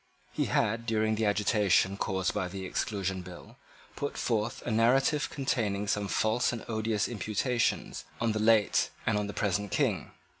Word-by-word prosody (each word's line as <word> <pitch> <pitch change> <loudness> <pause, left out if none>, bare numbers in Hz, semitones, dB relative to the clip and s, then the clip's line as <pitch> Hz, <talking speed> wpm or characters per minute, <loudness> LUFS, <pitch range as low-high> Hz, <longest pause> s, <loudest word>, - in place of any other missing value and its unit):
He - - 0
had, 115 +2 0
during 110 -1 +1
the 110 0 0
agitation 100 -2 +2
caused 95 -2 -1
by 90 - -1
the 95 +1 -6
Exclusion 95 -1 -2
Bill, 90 +6 -12 0.4
put 145 - -4
forth 115 -1 -1
a 120 - -3
narrative 135 +7 +3
containing 110 -8 -1
some 105 0 0
false 115 +6 +1
and 120 -2 -6
odious 110 -2 0
imputations 120 +3 -1 0.2
on 115 -1 +1
the 110 - -1
late 110 -1 +3 0.2
and 110 - +2
on 105 0 0
the 105 - -6
present 105 0 -1
King. - - 0
110 Hz, 160 wpm, -29 LUFS, 100-115 Hz, 0.4 s, narrative